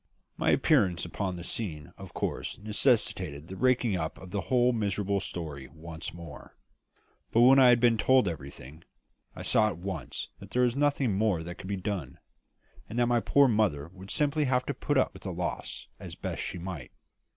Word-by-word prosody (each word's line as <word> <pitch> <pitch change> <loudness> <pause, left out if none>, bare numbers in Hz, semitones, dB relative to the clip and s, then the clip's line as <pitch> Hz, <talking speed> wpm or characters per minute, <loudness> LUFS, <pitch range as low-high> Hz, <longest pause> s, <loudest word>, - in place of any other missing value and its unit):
My - - 0
appearance 90 -3 +3
upon 95 +2 -3
the 85 - -7
scene 80 -7 -5
of - - -11
course - - -3
necessitated 100 - 0
the 95 - -6
raking 125 -3 +2
up 80 -2 -3
of 95 -1 -11
the 100 - -1
whole 125 +7 +3
miserable 100 -2 0
story 75 -8 -5
once 80 +4 -7
more; 85 0 -11 0.7
but 115 - +4
when 130 +3 +8
I 130 -2 +8
had 120 -1 +6
been 115 -2 +4
told 130 -4 +4
everything, 70 -1 -7 0.5
I - - -7
saw 110 - +4
at 100 - -3
once 95 +2 -5
that - - -12 0.2
nothing 140 -6 +1
more 100 -5 +1
could 85 +2 -8
be 100 0 -2
done, 90 -8 -4 0.7
and 115 - -5
that 120 - +4
my 120 0 +3
poor 140 +4 +4
mother 100 - +1
would 95 +1 -12
simply 150 +3 +1
have 125 -1 +1
to 140 - -2
put 145 +2 -1
up 130 - +2
with 95 - -12
the 95 - -4
loss 90 0 -4
as - - -8
best - - -4
she 90 - -4
might. 85 -7 -6
100 Hz, 185 wpm, -29 LUFS, 85-120 Hz, 0.7 s, when